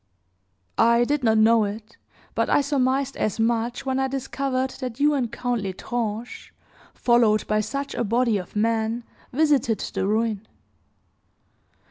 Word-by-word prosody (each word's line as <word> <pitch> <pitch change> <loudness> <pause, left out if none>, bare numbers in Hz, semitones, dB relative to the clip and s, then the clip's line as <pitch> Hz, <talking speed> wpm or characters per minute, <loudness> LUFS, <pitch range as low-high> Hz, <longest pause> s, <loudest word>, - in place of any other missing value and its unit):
"I 235 +1 +5
did 285 +2 0
not 220 -2 +3
know 225 +1 +5
it; 215 +2 -6 0.4
but - - 0
I - - +4
surmised 275 -1 0
as 215 +1 -1
much 230 +2 0
when 265 0 0
I 265 - +1
discovered 265 0 -2
that 250 -2 -5
you 295 +1 +4
and 250 -5 -1
Count 245 -2 -2
L'Estrange, 215 +4 -4 0.4
followed 235 -3 +3
by 215 0 +1
such 275 +6 -3
a - - -1
body 230 -1 +1
of 180 - -10
men, 225 +2 0 0.3
visited 275 -6 +2
the - - -2
ruin. 220 0 -1
235 Hz, 140 wpm, -24 LUFS, 220-265 Hz, 0.4 s, I